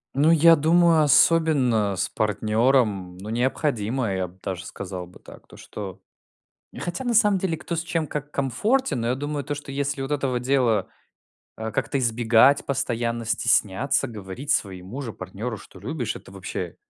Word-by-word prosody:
Ну 145 +4 +4
я 165 0 +7
думаю, 165 +1 +4
особенно 135 -9 +3
с 95 0 -1
партнером 105 -2 +1
ну 100 +3 -8
необходимо, 120 -2 -1
я 95 -1 -1
б 90 +2 -19
даже 95 -2 -4
сказал 90 -2 -7
бы 90 - -17
так, - - -15
то - - -15
что 95 -2 -8 0.8
Хотя, 175 +9 -4
на 240 - 0
самом 210 -3 +4
деле, 180 -3 -1
кто 170 - -5
с 165 - 0
чем 165 -2 -2
как 145 0 -5
комфортен, 205 - 0
но 115 - -1
я 125 - +1
думаю 145 +1 -3
то, 145 +2 -3
что 145 -1 -8
если 140 0 -2
вот 135 +2 -4
этого 135 -4 0
дела, 125 -6 +1 0.7
а, 110 0 -5
как-то 125 +5 -1
избегать, 120 +2 +4
постоянно 120 -3 -2
стесняться 120 +3 +1
говорить 110 +5 -7
своему 100 0 -2
же 115 -5 -5
партнеру, 105 +5 -6
что - - -15
любишь, 130 -9 -4
это - - -13
вообще, 95 -3 -6
125 Hz, 165 wpm, -24 LUFS, 105-145 Hz, 0.8 s, я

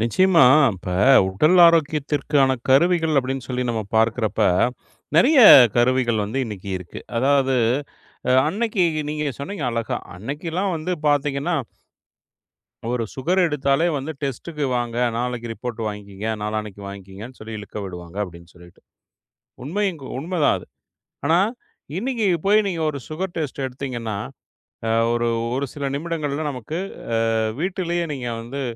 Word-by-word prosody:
நிச்சயமா. 170 - +4 0.3
இப்ப 90 0 -5 0.3
உடல் 155 - +3
ஆரோக்கியத்திற்கான 150 -4 +2
கருவிகள் 160 +3 +3
அப்படின்னு 130 -1 -3
சொல்லி 125 -1 -2
நம்ம 115 -2 -1
பார்க்குறப்ப, 110 -1 +2 0.7
நிறைய 275 - +5 0.4
கருவிகள் 120 -2 +2
வந்து 115 +7 -2
இன்னைக்கு 100 -2 -7
இருக்கு. 90 -2 -10 0.2
அதாவது 135 0 +2 0.7
அ - - +3 0.2
அன்னைக்கு 210 +1 0 0.3
நீங்க 150 -2 -2
சொன்னீங்க 155 +1 -5
அழகா. 115 -1 -2 0.2
அன்னைக்கெல்லாம் 165 - -3
வந்து 160 +3 -3 0.2
பாத்தீங்கன்னா 145 +3 0 1.4
ஒரு 120 -2 -1
சுகர் 175 +8 +1
எடுத்தாலே 145 +1 +1
வந்து 140 +3 -4
டெஸ்ட்க்கு 145 +3 -4
வாங்க, 120 -1 -3 0.2
"நாளைக்கு 120 -1 -3
ரிப்போர்ட் 120 0 -6
வாங்கிக்கங்க. 105 -1 -6 0.2
நாளான்னைக்கு 105 -1 -4
வாங்கிக்கங்கன்னு 100 +5 -10
சொல்லி 110 0 -7
இழுக்க 105 +1 -8
விடுவாங்க." 90 -1 -9
அப்படின்னு 85 -2 -13
சொல்லிட்டு, 85 0 -17 0.8
உண்மையும் 185 +3 -1
கூ - - -8
உண்மைதான் 165 0 +1
அது. - - -13 0.6
ஆனா 165 +3 +4 0.6
இன்னைக்கு 235 0 -1 0.2
போய் 210 +1 +4
நீங்க 175 -4 -3
ஒரு 145 - -6
சுகர் 175 +3 -4
டெஸ்ட் 145 -4 -3
எடுத்தீங்கன்னா, 125 -4 -5 0.7
அ - - +1 0.2
ஒரு 120 0 0 0.3
ஒரு 140 +1 -1
சில 140 -2 -3
நிமிடங்கள்ல 155 -1 -3
நமக்கு, 130 +6 -5 0.4
அ - - +2 0.4
வீட்டிலயே 175 -1 -1
நீங்க 125 -3 -5
வந்து 130 +5 -5
135 Hz, 125 wpm, -22 LUFS, 115-165 Hz, 1.4 s, நிறைய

